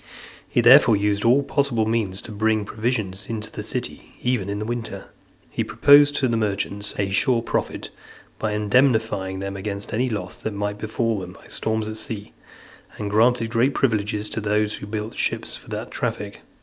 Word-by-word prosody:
He 120 Hz, -, +2 dB
therefore 120 Hz, -2 st, +7 dB
used 100 Hz, 0 st, 0 dB
all 125 Hz, +4 st, +4 dB
possible 135 Hz, -6 st, +1 dB
means 110 Hz, -4 st, -1 dB
to -, -, -9 dB
bring 110 Hz, 0 st, +1 dB
provisions 110 Hz, -3 st, -2 dB
to 110 Hz, -1 st, -5 dB
the -, -, -6 dB
city, -, -, -5 dB
even 120 Hz, -6 st, 0 dB
in 100 Hz, -, -2 dB
the 105 Hz, -, -3 dB
winter. 120 Hz, 0 st, -5 dB, 0.4 s
He -, -, -1 dB
proposed 145 Hz, 0 st, +6 dB
to 135 Hz, -, +2 dB
the 115 Hz, -2 st, +1 dB
merchants 100 Hz, -1 st, -2 dB
a 100 Hz, -1 st, -1 dB
sure 115 Hz, +4 st, +2 dB
profit, -, -, -3 dB, 0.5 s
by 110 Hz, -1 st, -1 dB
indemnifying 105 Hz, -3 st, +2 dB
them 100 Hz, 0 st, -4 dB
against 100 Hz, +1 st, -5 dB
any 125 Hz, +4 st, +1 dB
loss 100 Hz, -5 st, -4 dB
that 110 Hz, -2 st, -4 dB
might 105 Hz, 0 st, -3 dB
befall 110 Hz, 0 st, -1 dB
them 90 Hz, -1 st, -8 dB
by -, -, -17 dB
storms 110 Hz, -1 st, -1 dB
at 110 Hz, 0 st, -5 dB
sea; 110 Hz, -1 st, -4 dB, 0.6 s
and 105 Hz, -1 st, -4 dB
granted 115 Hz, +1 st, +3 dB
great 125 Hz, +4 st, +2 dB
privileges 105 Hz, -4 st, 0 dB
to 110 Hz, -, -1 dB
those 105 Hz, 0 st, 0 dB
who 100 Hz, -, -8 dB
built 110 Hz, +1 st, -4 dB
ships -, -, -1 dB
for -, -, -13 dB
that -, -, -5 dB
traffic. -, -, -4 dB
110 Hz, 180 wpm, -23 LUFS, 100-115 Hz, 0.6 s, therefore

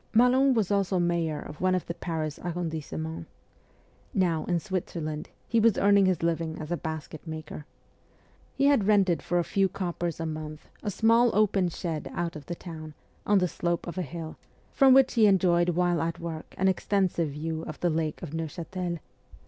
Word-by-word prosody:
Malon 255 Hz, +3 st, +5 dB
was 210 Hz, -4 st, +1 dB
also 195 Hz, -2 st, +1 dB
mayor 170 Hz, -3 st, 0 dB
of 150 Hz, -, -9 dB
one 185 Hz, 0 st, +3 dB
of 185 Hz, -, -2 dB
the 170 Hz, -, -4 dB
Paris 160 Hz, -3 st, -4 dB
arrondissements. 160 Hz, -2 st, -4 dB, 0.9 s
Now, 170 Hz, -5 st, +1 dB
in 175 Hz, -2 st, +1 dB
Switzerland, 165 Hz, -5 st, -4 dB, 0.2 s
he 230 Hz, -, +2 dB
was 225 Hz, -1 st, +4 dB
earning 200 Hz, -1 st, +5 dB
his 180 Hz, -3 st, 0 dB
living 165 Hz, -1 st, -1 dB
as 155 Hz, +1 st, -7 dB
a -, -, +2 dB
basket 160 Hz, 0 st, -6 dB
maker. 155 Hz, -1 st, -7 dB, 0.9 s
He 275 Hz, -, +2 dB
had 280 Hz, -9 st, +4 dB
rented 195 Hz, -5 st, +3 dB
for 175 Hz, -, -1 dB
a 175 Hz, -, +3 dB
few 195 Hz, +2 st, +1 dB
coppers 175 Hz, -3 st, -3 dB
a 165 Hz, -, -2 dB
month 155 Hz, -1 st, -6 dB
a 210 Hz, -, -2 dB
small 230 Hz, +4 st, +4 dB
open 200 Hz, -3 st, +3 dB
shed 160 Hz, -5 st, -4 dB
out 170 Hz, -1 st, -2 dB
of 150 Hz, -2 st, -9 dB
the 175 Hz, -, -3 dB
town, 155 Hz, -3 st, -9 dB, 0.3 s
on 205 Hz, -, +5 dB
the 180 Hz, -1 st, +3 dB
slope 170 Hz, 0 st, -2 dB
of 175 Hz, +1 st, -5 dB
a -, -, +1 dB
hill, 165 Hz, -2 st, -6 dB, 0.3 s
from 265 Hz, -2 st, +6 dB
which 265 Hz, -1 st, +5 dB
he 225 Hz, -3 st, +5 dB
enjoyed 175 Hz, -3 st, +3 dB
while 175 Hz, -1 st, +1 dB
at 165 Hz, +1 st, -2 dB
work 165 Hz, -2 st, -6 dB
an 190 Hz, -, +2 dB
extensive 190 Hz, -3 st, +1 dB
view 160 Hz, +2 st, -4 dB
of 155 Hz, -, -7 dB
the 175 Hz, -, +2 dB
Lake 155 Hz, -1 st, -2 dB
of 145 Hz, -, -6 dB
Neuchatel. 170 Hz, +2 st, -4 dB
175 Hz, 185 wpm, -28 LUFS, 160-190 Hz, 0.9 s, from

